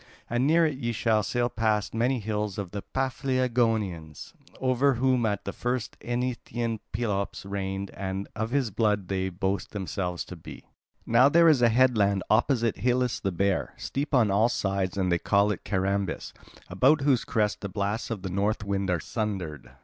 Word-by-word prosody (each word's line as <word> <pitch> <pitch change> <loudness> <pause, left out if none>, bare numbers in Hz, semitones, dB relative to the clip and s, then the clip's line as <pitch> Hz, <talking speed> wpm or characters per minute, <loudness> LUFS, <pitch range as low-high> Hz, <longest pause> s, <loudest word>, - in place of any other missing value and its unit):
And 120 +3 +2
near 165 +2 +5
it 145 -4 -2
ye 120 -3 -2
will 110 -2 +4
sail 120 +4 0
past 110 -3 0
many 120 +4 +1
hills 105 -2 -3
of 100 -4 -4
the 100 - -4
Paphlagonians, 115 - -1 0.3
over 130 +1 +2
whom 125 -1 +2
at 100 -2 -2
the 100 - -4
first 125 -1 -2
Eneteian 120 -2 -2
Pelops 105 -4 -2
reigned, 100 0 -4
and 95 0 -4
of 110 +1 -2
his 130 -3 0
blood 105 -3 0
they 95 -1 -1
boast 95 +1 -2
themselves 95 -3 -3
to 90 - -9
be." 85 - -11 0.4
"Now 125 +4 +5
there 170 +3 +6
is 150 -6 +5
a 120 - +6
headland 110 -6 +3
opposite 115 0 +2
Helice 125 -1 +1
the 95 - -1
Bear, 95 +2 0
steep 140 +1 -2
on 115 -5 +4
all 110 +4 +3
sides, 95 -4 -1
and 95 -2 +1
they 85 - +2
call 100 +3 +3
it 100 - -5
Carambis, 100 0 -1 0.3
about 135 - +3
whose 135 -4 +3
crests 105 -2 0
the 100 - -4
blasts 100 +3 -2
of 110 -5 -4
the 95 - -4
north 105 +4 0
wind 100 -1 -1
are 90 -2 +1
sundered. 90 - -4
105 Hz, 175 wpm, -27 LUFS, 100-120 Hz, 0.4 s, there